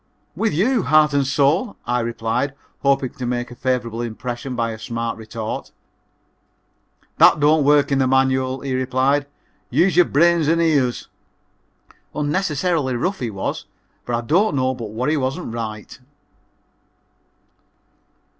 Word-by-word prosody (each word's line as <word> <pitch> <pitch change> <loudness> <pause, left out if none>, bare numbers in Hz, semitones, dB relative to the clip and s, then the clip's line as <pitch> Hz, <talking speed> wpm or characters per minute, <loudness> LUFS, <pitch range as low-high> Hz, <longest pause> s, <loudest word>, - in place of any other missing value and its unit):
"With 225 - 0
you, 225 - +2
heart 155 -2 +4
and 140 -2 +1
soul," 145 - +1
I 120 +1 0
replied, 115 +3 -2 0.3
hoping 135 -2 +1
to 125 - -7
make 120 0 -3
a - - -9
favorable 120 -3 -2
impression 120 +2 -5
by 115 -1 -1
a 110 - -8
smart 115 0 -3
retort. 110 0 -6 1.5
"That - - +7
don't 150 +1 +4
work 145 0 +3
in 135 - +2
the 130 - +2
manual," 130 0 +1
he 135 -2 -3
replied; 130 +2 +1 0.4
"use 185 +2 +2
your 175 0 +6
brain 170 +3 +3
and 165 +1 +2
ears." 145 -7 +1 1.1
Unnecessarily 150 -2 0
rough 185 +10 -2
he 120 - -3
was, 100 -3 -4 0.4
but 120 - 0
I 115 - -1
don't 165 - +2
know 130 -1 +1
but 115 -4 -7
what 115 +4 -3
he 155 - +1
wasn't 130 -3 -3
right. 110 -1 -6
130 Hz, 140 wpm, -21 LUFS, 120-150 Hz, 1.5 s, That